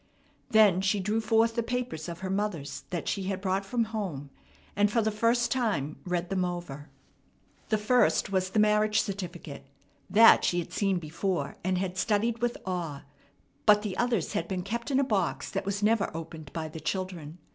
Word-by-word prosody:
Then 210 -5 +5
she 195 +1 +1
drew 210 +4 0
forth 225 +1 +3
the 235 - 0
papers 240 -9 -3
of 170 +1 -7
her 190 - -3
mother's 195 -8 -3
that 175 -2 -4
she 195 -2 -1
had 195 0 -2
brought 190 0 -1
from 230 +4 0
home, 190 -11 -5 0.4
and 205 +1 +3
for 230 - +2
the 220 -1 +1
first 230 +3 +1
time 200 - -1
read 180 0 -2
them 185 -1 +1
over. 175 -5 -5 0.8
The 215 - +3
first 215 -1 +2
was 185 -1 +1
the 190 - -3
marriage 210 0 +3
certificate. 175 -8 -6 0.4
That 225 +2 +7
she 175 - +1
had 175 0 -3
seen 195 -1 +1
before, 165 -1 -3
and 185 +1 0
had 185 0 -2
studied 225 +3 +1
with 240 0 0
awe; 170 -6 -4 0.6
but 210 0 +6
the 200 -4 -3
others 235 -8 0
had 165 - -1
been 185 -2 -3
kept 235 +6 -4
in 270 -1 +2
a - - +3
box 205 -9 -1
that 190 - -3
was 200 +1 -2
never 215 -1 +3
opened 160 -3 -8
by 160 -1 -4
the 160 +1 -8
children. 175 -2 -4
195 Hz, 190 wpm, -28 LUFS, 175-220 Hz, 0.8 s, That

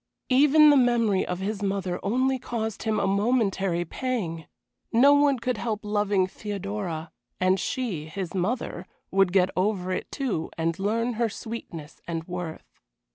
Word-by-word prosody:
Even 295 +3 +7
the 290 - +6
memory 235 -6 +3
of 180 - -2
his 205 +1 -3
mother 195 -3 -1
only 255 +5 +1
caused 225 -3 -4
him 220 -1 0
a - - +1
momentary 195 -4 +1
pang. 180 - -3 0.4
No 270 +5 +6
one 285 -1 +4
could 245 0 -2
help 220 -2 -2
loving 205 -2 +2
Theodora, 195 -4 -5 0.3
and 185 +1 +3
she 210 - -2
his 180 +1 -5
mother 190 -1 -2 0.2
would 195 -1 +3
get 185 0 +3
over 185 -1 0
it, - - -3
too, 240 - -2
and 165 +1 -1
learn 230 +5 0
her 230 - +3
sweetness 180 -9 -8
and 165 -1 -3
worth. 180 -3 -5
200 Hz, 150 wpm, -26 LUFS, 180-235 Hz, 0.4 s, Even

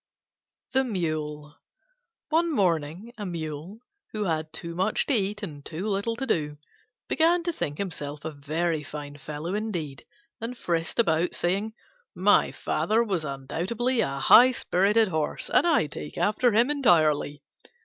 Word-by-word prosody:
THE 265 0 +3
MULE 155 - -3 0.7
One 330 +1 +2
morning 180 - 0
a 205 - -4
Mule, 165 +4 -6 0.3
who 215 -1 -1
had 160 -4 -2
too 170 +1 -6
much 190 +5 +1
to 285 - +1
eat 205 -2 0
and 145 -7 -7
too 170 +6 -5
little 205 +3 -1
to 265 - -3
do, 150 - -1 0.5
began 335 +2 +3
to 345 0 -1
think 145 - -3
himself 150 -6 -5
a 160 - -3
very 155 +3 -2
fine 145 -1 -8
fellow 155 +5 -5
indeed, 175 - -4 0.4
and 235 +2 -5
frisked 165 -4 -2
about 170 -6 +2
saying, 200 +5 -1 0.4
"My - - +4
father 225 +2 0
was 190 -8 -1
undoubtedly 180 - -2
a 135 -8 -1
high 235 - +8
spirited 210 +1 +2
horse 155 -3 -2
and - - +4
I 325 - +3
take 150 0 -8
after 225 +4 +2
him 235 +6 +3
entirely." 155 - +2
175 Hz, 150 wpm, -26 LUFS, 150-220 Hz, 0.7 s, high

